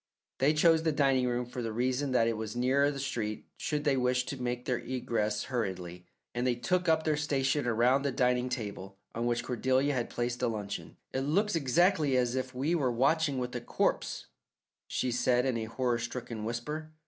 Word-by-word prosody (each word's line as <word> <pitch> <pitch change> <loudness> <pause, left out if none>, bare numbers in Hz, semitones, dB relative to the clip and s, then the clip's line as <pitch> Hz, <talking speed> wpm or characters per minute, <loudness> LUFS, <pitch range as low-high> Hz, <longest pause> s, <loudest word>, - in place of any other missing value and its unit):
They 145 +4 +3
chose 160 +1 +5
the 160 -1 +1
dining 135 -3 +2
room 125 0 -1
for 125 +1 -6
the 115 -1 -3
reason 130 +4 0
that 115 -3 +3
it 115 - 0
was 110 +1 -5
nearer 135 +4 +3
the 145 - -4
street 115 -6 -3
should 150 -1 -2
they 145 -2 +3
wish 125 0 +1
to 135 -1 -5
make 125 0 -2
their 125 -2 0
egress 115 -4 -1
hurriedly, 90 -8 -4 0.3
and 120 +1 0
they 125 - +2
took 175 +9 0
up 160 0 +3
their 155 -1 +2
station 145 -2 0
around 120 +4 +3
the 140 0 0
dining 125 0 +1
table 100 -6 -5 0.2
on 115 +1 -1
which 120 0 0
Cordelia 130 +3 +1
had 120 -3 -1
placed 120 0 -2
a 125 - +2
luncheon. 105 -3 -5 0.2
"It 130 - 0
looks 190 +9 +1
exactly 155 -1 +3
as 125 -1 +1
if 130 0 -3
we 140 +7 0
were 140 -7 +2
watching 140 +4 +2
with 125 0 -3
a 120 - -2
corpse," - - -1 0.6
she 125 - -1
said 125 +1 +2
in 130 -2 +1
a 115 -1 -2
horror 120 +1 -1
stricken 120 -2 -5
whisper. 150 +7 -4
125 Hz, 200 wpm, -30 LUFS, 120-140 Hz, 0.6 s, chose